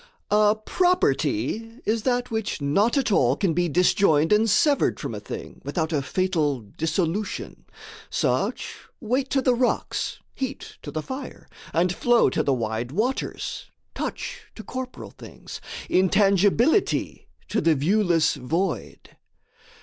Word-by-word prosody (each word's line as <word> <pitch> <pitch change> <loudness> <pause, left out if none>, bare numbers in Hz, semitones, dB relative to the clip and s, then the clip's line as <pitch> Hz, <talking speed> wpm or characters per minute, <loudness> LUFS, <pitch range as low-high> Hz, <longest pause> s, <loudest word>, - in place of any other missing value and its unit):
A 210 0 +5
property 220 - 0
is 220 +1 +1
that 245 0 0
which 220 -2 -2
not 200 - +2
at 265 -5 +1
all 130 -9 +3
Can 180 0 0
be 175 +1 +1
disjoined 165 -1 +3
and 220 +2 +3
severed 285 +8 +3
from - - -4
a - - -5
thing - - -8
Without 160 -2 -2
a 145 - +1
fatal 155 -4 0
dissolution: 165 - -3 0.4
such, - - -1 0.2
Weight 255 +4 -1
to 270 -1 +1
the 250 - +4
rocks, 245 +1 -1
heat 270 -1 -5
to - - -7
the 155 -1 -4
fire, 260 0 -7 0.2
and 175 +2 +2
flow 240 +5 +3
To - - +1
the 140 - +1
wide 115 -1 -2
waters, 230 - -2 0.2
touch - - -5
to 220 - -9
corporal 255 +4 -7
things, - - -11 0.3
Intangibility 200 - +2 0.2
to - - 0
the 165 -1 +3
viewless 170 +1 +2
void. 165 +7 -3
195 Hz, 135 wpm, -24 LUFS, 160-235 Hz, 0.4 s, A